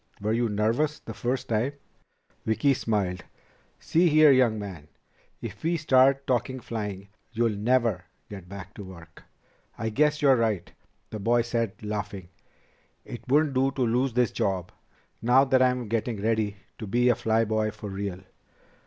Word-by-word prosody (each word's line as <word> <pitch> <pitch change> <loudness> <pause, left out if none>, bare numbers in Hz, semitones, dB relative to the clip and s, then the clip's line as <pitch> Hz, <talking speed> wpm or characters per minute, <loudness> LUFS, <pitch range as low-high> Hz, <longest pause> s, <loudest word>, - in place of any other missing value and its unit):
Were 105 +2 -1
you 120 0 +1
nervous 115 +9 0
the 115 - -8
first 125 +3 -2
time?" 115 +5 0 0.7
Vicki 135 +6 +2
smiled. 100 -7 -1 0.6
"See 170 +2 +2
here, 155 -1 +7
young 125 -4 +4
man, 95 -8 -7 0.6
if - - -7
we 170 +1 0
start 135 -2 +4
talking 130 +1 -1
flying 105 -4 -5 0.2
you'll 115 -2 +1
never 110 -4 +1 0.2
get 95 -4 -10
back 100 -1 -9
to 105 - -9
work." 85 -3 -13 0.5
"I 110 -1 -2
guess 150 +6 +2
you're 140 -2 +5
right," 110 -6 -1 0.4
the 110 - -5
boy 120 +3 +2
said, 115 -3 -1
laughing. 105 -3 -5 0.8
"It 120 -1 -9
wouldn't 145 +1 +3
do 135 +1 +2
to 135 - -4
lose 125 +2 +1
this 125 -1 +2
job, 95 -3 -2 0.5
now 125 +4 +5
that 130 -1 +3
I'm 125 -2 +2
getting 115 0 -2
ready 110 -1 0 0.2
to 110 - -6
be 120 +4 +2
a 120 - +4
fly 110 +1 +1
boy 110 0 0
for 105 -1 -8
real." 95 -1 -4
115 Hz, 160 wpm, -26 LUFS, 105-130 Hz, 0.8 s, here